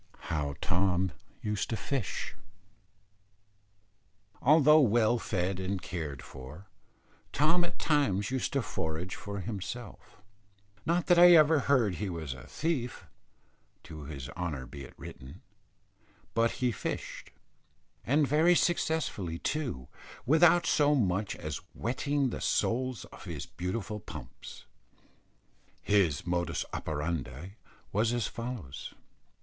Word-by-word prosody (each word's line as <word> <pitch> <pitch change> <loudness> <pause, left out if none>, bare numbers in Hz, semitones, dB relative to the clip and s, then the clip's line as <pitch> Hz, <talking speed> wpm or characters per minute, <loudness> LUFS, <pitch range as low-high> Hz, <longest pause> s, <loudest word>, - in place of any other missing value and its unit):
HOW 70 -2 -1
TOM 90 -1 +2 0.3
USED 105 -2 -1
TO 115 - -1
FISH. 135 -4 -3 2.1
Although 150 +2 +7
well 120 -2 +4
fed 95 -3 -1
and 95 +1 -2
cared 80 -7 -5
for, 70 +8 -10 0.7
Tom 165 +5 +3
at 175 - -4
times 115 - +1
used 130 -1 -1
to 140 -3 +1
forage 80 -1 -3
for 100 -1 -5
himself, 105 +3 -7 0.7
not 170 +1 +2
that 175 -1 +5
I 175 0 +10
ever 155 -1 +6
heard 125 -7 +3
he 105 -1 -2
was 80 -6 -4
a - - -12
thief 145 -7 -2 0.8
to 75 -2 -9
his 70 -3 -6
honour 75 -5 -4
be 70 +2 -9
it - - -15
written; 65 +1 -10 0.9
but 115 +1 +2
he 125 -1 0
fished, 110 - -5 0.7
and 145 +3 +3
very 160 +5 +5
successfully 160 - 0
too, 125 - -2 0.4
without 165 +5 +5
so 150 0 +4
much 100 -4 +1
as 75 -2 -5
wetting 135 +3 0
the - - -5
soles 130 +1 0
of - - -11
his - - -5
beautiful 105 +4 -4
pumps. - - -10 1.1
His 95 -8 +2
modus 85 0 -1
operandi 75 0 -3 0.4
was 110 +3 +2
as 120 -2 0
follows. 115 - -6
105 Hz, 120 wpm, -30 LUFS, 85-140 Hz, 2.1 s, I